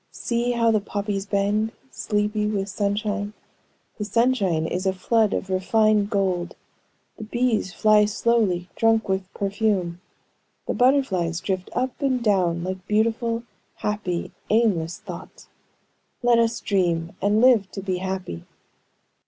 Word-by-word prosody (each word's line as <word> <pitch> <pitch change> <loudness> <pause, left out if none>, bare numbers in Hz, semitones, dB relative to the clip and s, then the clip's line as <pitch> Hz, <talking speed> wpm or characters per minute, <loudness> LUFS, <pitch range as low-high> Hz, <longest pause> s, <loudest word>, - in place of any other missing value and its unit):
See 240 +1 -1
how 230 -1 +3
the 215 - +3
poppies 200 0 -3
bend, 205 +2 0 0.2
sleepy 210 0 -1
with 200 -2 -2
sunshine; 205 +1 -2 0.7
the - - -1
sunshine 205 -7 +1
is 180 +3 -2
a 190 - +2
flood 215 +3 +2
of 190 - -3
refined 210 +2 +2
gold; 185 -4 -1 0.6
the 220 - -7
bees 225 -3 0
fly 215 +1 +4
slowly, 210 -4 +1
drunk 225 0 +2
with 190 -1 -2
perfume; 195 -4 -1 0.6
the - - -1
butterflies 220 -11 +2
drift 185 0 -3
up 255 +2 -2
and 260 -3 +1
down 180 -5 +2
like 185 0 -5
beautiful, 230 +2 +1 0.3
happy, 205 -5 -3 0.2
aimless 195 -7 +2
thoughts. - - -10 0.7
Let 240 -1 +5
us 230 0 +1
dream, 170 -4 0
and 205 +2 +3
live 230 -5 +5
to 195 - -7
be 185 -2 -1
happy." 185 - -4
205 Hz, 130 wpm, -24 LUFS, 190-225 Hz, 0.7 s, Let